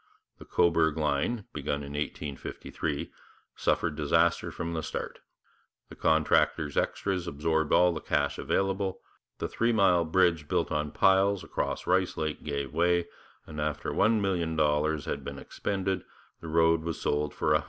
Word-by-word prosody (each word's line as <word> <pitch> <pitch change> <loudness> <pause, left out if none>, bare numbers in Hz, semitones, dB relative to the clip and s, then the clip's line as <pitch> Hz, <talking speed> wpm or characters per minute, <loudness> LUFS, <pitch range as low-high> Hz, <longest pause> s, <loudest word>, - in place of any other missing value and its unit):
The - - -11
Cobourg 80 -2 +2
line, 80 +9 0
begun 70 0 -2
in 70 - -8
1853, 75 +1 -4 0.4
suffered 80 -3 0
disaster 80 +3 +2
from 85 0 -4
the 80 - -2
start: - - -5 0.7
the - - -11
contractor's 80 -1 +2
extras 95 -3 -1
absorbed 80 +1 0
all 90 0 +5
the 80 - -4
cash 70 -1 0
available; 95 -1 -1 0.4
the - - -2
three 115 +1 +1
mile 95 -6 +4
bridge 85 -2 +2
built - - 0
on 75 0 -1
piles 95 +3 +3
across - - -3
Rice - - +1
Lake 80 -1 -2
gave 70 -2 -3
way, 85 +1 +2 0.4
and 75 -1 -6
after 75 -1 -2
$1,000,000 80 -8 +1
had - - -3
been - - -6
expended 95 -2 -3 0.4
the 85 - -9
road 80 0 +3
was 80 -1 -4
sold 75 0 0
for 75 - 0
$100,000. 75 - +5
80 Hz, 145 wpm, -29 LUFS, 75-90 Hz, 0.7 s, all